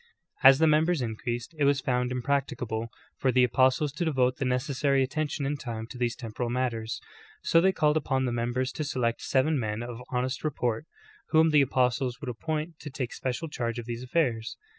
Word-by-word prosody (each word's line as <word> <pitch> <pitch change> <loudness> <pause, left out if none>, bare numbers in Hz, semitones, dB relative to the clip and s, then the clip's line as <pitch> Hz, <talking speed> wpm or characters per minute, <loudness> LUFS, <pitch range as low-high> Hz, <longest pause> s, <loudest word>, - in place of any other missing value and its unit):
As 135 -1 +9
the 160 - +4
members 155 -1 +3
increased, 120 +4 -4
it - - +2
was 140 -1 +3
found 125 -1 0
impracticable 125 -3 -1 0.3
for 130 - +2
the 125 0 +4
apostles 130 +4 +3
to 160 +5 -3
devote 130 -5 +1
the 135 - -2
neces 125 +2 -1
sary 135 0 +3
attention 150 +1 -2
and 145 +1 -2
time 115 -3 -5
to - - -8
these 120 -1 0
temporal 120 0 -4
matters, 120 -2 -2 0.4
so 165 - +4
they 190 +2 +4
called 150 -4 +2
upon 135 -3 0
the 125 - -1
members 120 +2 -1
to 155 - -4
select 125 -5 -1
seven 140 +2 +2
men 110 0 -2
of 120 0 -7
honest 130 +2 -2
re 155 - +1
port, 125 0 -2 0.4
whom 160 0 +5
the 150 -1 +6
apostles 125 -1 +1
would 145 -4 -5
appoint 155 +6 -4
to 150 - -7
take 130 -3 -4
special 130 +5 -3
charge 120 -6 -3
of 120 - -5
these 120 +1 -5
aflfairs. 125 -5 0
130 Hz, 200 wpm, -28 LUFS, 120-145 Hz, 0.4 s, As